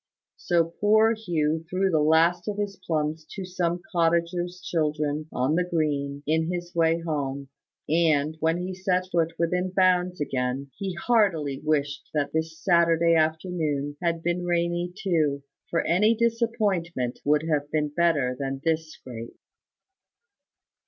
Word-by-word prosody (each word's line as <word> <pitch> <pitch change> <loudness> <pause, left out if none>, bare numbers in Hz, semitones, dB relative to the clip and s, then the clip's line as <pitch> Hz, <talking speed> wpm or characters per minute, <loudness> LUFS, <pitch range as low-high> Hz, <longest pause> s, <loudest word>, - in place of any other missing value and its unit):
So 170 -1 +2 0.2
poor 220 +2 +5
Hugh 165 -7 -1
threw 190 +1 +1
the 160 - +3
last 165 +3 +3
of 205 -1 -2
his 205 -1 -2
plums 155 -3 -2
to 195 - -5
some 175 -1 -2
cottager's 170 +1 0
children 150 -3 -1
on 130 +4 0
the 180 +2 +2
green, 145 -5 -1
in 160 +2 +1
his 175 -1 -5
way 165 0 +2
home; 140 -4 -3 0.4
and, 155 -2 +2
when 160 +1 +1
he 180 +1 -4
set 185 -1 0
foot 165 -1 +1
within 180 +2 0
bounds 180 -1 +2
again, 135 -1 -2
he 190 -2 -4
heartily 175 - +1
wished 145 -2 -1
that 145 -1 0
this 160 0 -2
Saturday 170 -2 +3
afternoon 155 -3 0
had 170 -1 -1
been 175 +1 -1
rainy 175 0 0
too; 155 -8 0 0.3
for 165 - 0
any 210 +7 +3
disappointment 215 - 0
would 150 +1 +2
have 150 -3 -1
been 150 -1 0
better 145 -5 +1
than 135 -1 -3
this 160 -1 0
scrape. 115 -5 -10
165 Hz, 140 wpm, -26 LUFS, 150-180 Hz, 0.4 s, poor